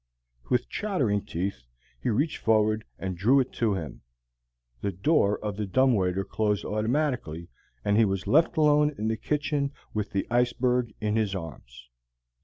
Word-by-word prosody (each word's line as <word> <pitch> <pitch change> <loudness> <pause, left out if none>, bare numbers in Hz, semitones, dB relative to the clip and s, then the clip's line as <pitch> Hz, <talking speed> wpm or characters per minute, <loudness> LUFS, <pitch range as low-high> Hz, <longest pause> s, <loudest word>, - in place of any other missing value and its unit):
With 125 0 +1
chattering 135 - -1
teeth, 90 -5 -3 0.4
he - - 0
reached 140 +8 0
forward 110 -1 +2
and 95 -1 -4
drew 115 +11 +4
it 130 - -1
to 110 -4 +1
him. 80 -9 -6 0.8
The 100 - -1
door 100 - +2
of 105 -2 -3
the 105 -1 -2
dumb 130 +6 +3
waiter 95 -2 0
closed 105 -2 -1
automatically, 110 - -1 0.4
and 100 0 +3
he 115 - +6
was 95 -1 -2
left 160 +3 +3
alone 150 -1 +4
in 110 +1 -1
the 110 - 0
kitchen 145 +3 -1 0.2
with 105 -1 -2
the 100 - -1
iceberg 125 0 +1
in 105 0 0
his 105 -3 0
arms. 60 -8 -9
110 Hz, 160 wpm, -27 LUFS, 95-130 Hz, 0.8 s, he